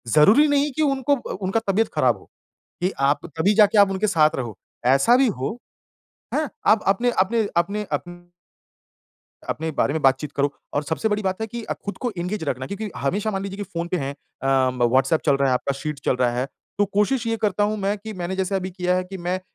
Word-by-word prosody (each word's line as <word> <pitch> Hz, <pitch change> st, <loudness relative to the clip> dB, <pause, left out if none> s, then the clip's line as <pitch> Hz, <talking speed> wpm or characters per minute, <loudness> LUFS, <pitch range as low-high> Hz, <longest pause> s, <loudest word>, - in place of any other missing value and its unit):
ज़रूरी 210 Hz, -, +6 dB
नहीं 290 Hz, 0 st, +2 dB
कि -, -, 0 dB
अ, -, -, +4 dB
उनको 275 Hz, 0 st, +2 dB
ब 245 Hz, -, -6 dB
उनका 190 Hz, +4 st, +1 dB
तबीयत 225 Hz, +4 st, +1 dB
खराब -, -, +3 dB
हो -, -, -19 dB, 0.5 s
कि 185 Hz, +2 st, +1 dB, 0.2 s
आप 145 Hz, -, 0 dB
तभी 190 Hz, +6 st, +3 dB
जाके 210 Hz, 0 st, +5 dB
आप 200 Hz, -1 st, +6 dB
उनके 195 Hz, +3 st, 0 dB
साथ 155 Hz, -5 st, +3 dB
रहो। 120 Hz, -6 st, -5 dB, 0.4 s
ऐसा 235 Hz, -, +5 dB
भी 265 Hz, -1 st, +4 dB
हो 140 Hz, -, -3 dB, 0.8 s
हाँ 305 Hz, -1 st, 0 dB, 0.2 s
आप 215 Hz, 0 st, +5 dB
अपने 235 Hz, +5 st, +3 dB
अपने 220 Hz, +3 st, +2 dB
अपने 200 Hz, +5 st, 0 dB
अपन 175 Hz, 0 st, -4 dB, 1.2 s
अपने 160 Hz, +1 st, -2 dB
बारे 140 Hz, -1 st, 0 dB
में 160 Hz, -, -1 dB
बात-चीत 135 Hz, +2 st, +2 dB
करो 140 Hz, +1 st, 0 dB, 0.2 s
और 145 Hz, -, +1 dB
सबसे 160 Hz, +7 st, -1 dB
बड़ी 210 Hz, 0 st, -1 dB
बात 190 Hz, +1 st, -2 dB
है 220 Hz, -, -1 dB
कि 235 Hz, +2 st, -6 dB
अ, -, -, -3 dB
खुद 200 Hz, -, -5 dB
को 245 Hz, -, -2 dB
एंगेज 180 Hz, +1 st, -3 dB
रखना 130 Hz, -2 st, -3 dB
क्योंकि 205 Hz, +4 st, -5 dB
हमेशा 190 Hz, +11 st, -1 dB
मान 195 Hz, -1 st, -3 dB
लीजिए 195 Hz, 0 st, -5 dB
कि 205 Hz, -, -4 dB
फ़ोन 170 Hz, -3 st, -4 dB
पे 180 Hz, -, 0 dB
हैं 140 Hz, -4 st, -3 dB, 0.3 s
अ, 135 Hz, -1 st, +3 dB, 0.2 s
व्हाट्सएप 130 Hz, +6 st, +3 dB
चल 140 Hz, -, +4 dB
रहा 140 Hz, 0 st, +2 dB
है, 130 Hz, -, +3 dB
आपका 135 Hz, +2 st, -1 dB
शीट 150 Hz, -1 st, -4 dB
चल 125 Hz, -, +2 dB
रहा 125 Hz, -1 st, +2 dB
है। 130 Hz, -, 0 dB, 0.3 s
तो 205 Hz, -, +4 dB
कोशिश 210 Hz, +5 st, 0 dB
ये 225 Hz, 0 st, 0 dB
करता 210 Hz, -2 st, +1 dB
हूँ 210 Hz, +1 st, 0 dB
मैं 200 Hz, 0 st, -1 dB
कि 220 Hz, +2 st, -7 dB
मैंने 180 Hz, 0 st, -4 dB
जैसे 190 Hz, +1 st, -1 dB
अभी 190 Hz, -1 st, -2 dB
किया 180 Hz, 0 st, 0 dB
है 185 Hz, -, -1 dB
कि 190 Hz, +1 st, -8 dB
मैं 180 Hz, +1 st, -2 dB
190 Hz, 230 wpm, -23 LUFS, 150-215 Hz, 1.2 s, ज़रूरी